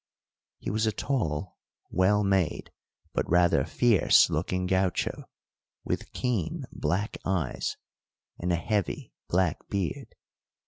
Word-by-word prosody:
He - - -4
was 110 +1 +1
a - - +3
tall, 95 - -2 0.3
well 105 +3 +3
made, 95 -4 0 0.4
but - - -1
rather 90 0 +4
fierce 115 -7 +4
looking 90 +3 -1
gaucho, 95 0 0 0.6
with - - -3
keen 115 -10 -2
black 90 +8 -2
eyes, 90 -9 -1 0.6
and 90 +1 -1
a - - +3
heavy 100 +3 -2 0.2
black 90 +1 +2
beard. 95 -7 -3
95 Hz, 110 wpm, -28 LUFS, 85-105 Hz, 0.6 s, rather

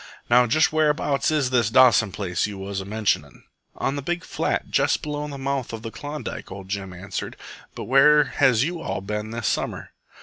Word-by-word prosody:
Now 125 0 +6
just 155 +7 +3
whereabouts 150 -2 +1
is 145 -5 +1
this 120 -4 +2
Dawson 115 -4 +5
place 90 -2 -2
you 100 -2 -7
was 95 0 -4
a - - -8
mentionin'?" 105 +1 -2 0.3
"On 135 - -2
the 145 - -3
big 175 +5 -3
flat - - -2
jest - - +2
below 150 0 -3
the 140 -1 -7
mouth 135 -2 -3
of 110 -1 -6
Klondike," 145 0 -7
ol' 95 +1 -7
Jim 95 0 -5
answered. 90 +3 -6 0.4
"But - - -5
where 150 +4 +6
has 130 -4 +2
you 170 +2 -3
all 95 - -3
ben 105 +2 -4
this 115 -1 -5
summer?" - - -2
125 Hz, 190 wpm, -24 LUFS, 105-145 Hz, 0.4 s, Now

